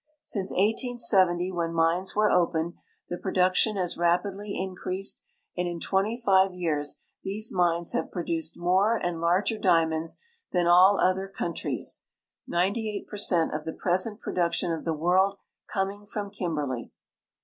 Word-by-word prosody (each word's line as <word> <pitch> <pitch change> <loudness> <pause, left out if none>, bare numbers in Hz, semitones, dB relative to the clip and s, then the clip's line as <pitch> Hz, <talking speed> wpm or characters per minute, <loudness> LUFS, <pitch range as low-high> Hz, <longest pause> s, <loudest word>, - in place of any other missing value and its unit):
Since 195 -8 -1
1870, 195 -5 +2
when 170 -2 -2
mines 165 +3 +1
were 210 0 +3
opened, 170 -1 +1 0.4
the 175 - -4
production 185 +3 +2
has 180 -3 -1
ra])idly 195 +4 0
increased, 185 +1 -1 0.3
and 180 0 -1
in 170 -1 -4
twent}'' 210 +7 -1
five 190 -2 +4
years 150 -5 -1 0.2
these 210 +3 -1
mines 170 -2 +1
have 160 - -1
]n'odiiced 165 -2 -3
more 190 +6 +2
and 175 -4 -3
larger 185 +6 +1
diamonds 165 -4 +1 0.3
than 175 -2 +1
all 180 +3 +6
other 190 +1 +2
countries, 175 -3 -3 0.5
98 200 +4 -1
per 210 - -8
cent 175 -5 +3
of 155 0 -3
the 160 0 -5
present 185 +5 0
production 170 -3 -1
of 165 -1 -4
the 165 - 0
world 185 +5 +2 0.3
coming 200 0 -2
from 205 -1 -5
Kimberley. 150 - -3
180 Hz, 140 wpm, -27 LUFS, 170-200 Hz, 0.5 s, all